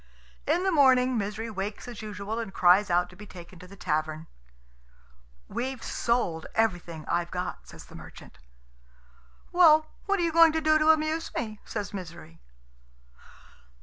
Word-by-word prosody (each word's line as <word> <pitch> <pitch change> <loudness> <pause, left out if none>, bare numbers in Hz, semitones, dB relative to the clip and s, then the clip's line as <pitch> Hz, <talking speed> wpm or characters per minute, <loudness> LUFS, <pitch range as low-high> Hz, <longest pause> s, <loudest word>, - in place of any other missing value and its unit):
In 335 +5 +1
the 380 - +1
morning 260 -4 +4
Misery 215 +1 -3
wakes 205 +2 -5
as 235 -3 -8
usual, 210 +1 -5
and 225 -4 -5
cries 185 +2 +4
out 175 0 +2
to - - -15
be 210 +3 -12
taken 175 -1 -12
to 180 - -12
the 200 - -13
tavern. 155 -3 -2 1.2
"We've 260 0 -4
sold 210 -9 -1
everything 175 -7 -1
I've 170 0 -1
got," 180 - -5
says - - -12
the - - -17
merchant. 60 - -13 1.1
"Well, 315 -3 +5 0.2
what 400 -1 +1
are - - +1
you 335 - +1
going 330 -1 +6
to 320 - +1
do 310 0 +3
to 310 +1 +3
amuse 315 +1 +2
me?" 215 -3 -4
says 205 -2 -5
Misery. 170 - -9
215 Hz, 155 wpm, -27 LUFS, 180-300 Hz, 1.2 s, going